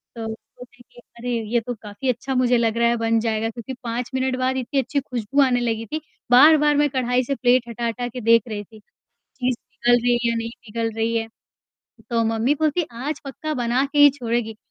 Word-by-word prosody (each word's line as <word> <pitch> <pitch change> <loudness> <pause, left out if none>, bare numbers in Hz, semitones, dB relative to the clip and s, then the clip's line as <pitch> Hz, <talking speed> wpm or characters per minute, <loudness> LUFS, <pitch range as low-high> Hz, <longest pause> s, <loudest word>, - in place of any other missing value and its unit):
तो 225 -1 -5
सोचा 240 +3 -11
कि, - - -16 0.2
"अरे, 245 +1 -4 0.2
ये 240 - +3
तो 245 +2 -4
काफ़ी 210 +5 -5
अच्छा 255 +2 -2
मुझे 250 -1 +3
लग 230 -1 0
रहा 235 0 +3
है, 235 - +2
बन 225 0 +1
जाएगा।" 225 0 -1
क्योंकि 235 +3 -7
5 235 +1 -3
मिनट 260 0 0
बाद 260 +1 0
इतनी 260 +2 -1
अच्छी 270 +3 -1
खुशबू 255 +1 -1
आने 250 -2 +3
लगी 225 -1 -2
थी। 310 0 -2 0.3
बार-बार 295 +3 +7
मैं 295 0 +3
कढ़ाई 255 -1 0
से 275 +3 -2
प्लेट 245 -1 +2
हटा 235 +1 -4
हटा 245 +1 -3
के 245 +1 -7
देख 230 0 +5
रही 210 -2 -5
थी। 220 +2 -17 0.6
चीज़ 250 -2 0
पिघल 245 -1 +1
रही 245 0 +3
है 240 -1 +1
या - - -1
नहीं 230 0 -3 0.2
पिघल 225 +1 -2
रही 230 +1 0
है, 225 0 -2 0.8
तो 230 -1 +2
मम्मी 225 +5 +1
बोलती 310 +3 +1
है, 325 - -2 0.2
"आज 300 -1 -3
पक्का 305 +3 -5
बना 245 +2 +1
के 295 - 0
ही 290 0 +9
छोड़ेगी।" 235 -4 -3
245 Hz, 220 wpm, -22 LUFS, 230-260 Hz, 0.8 s, ही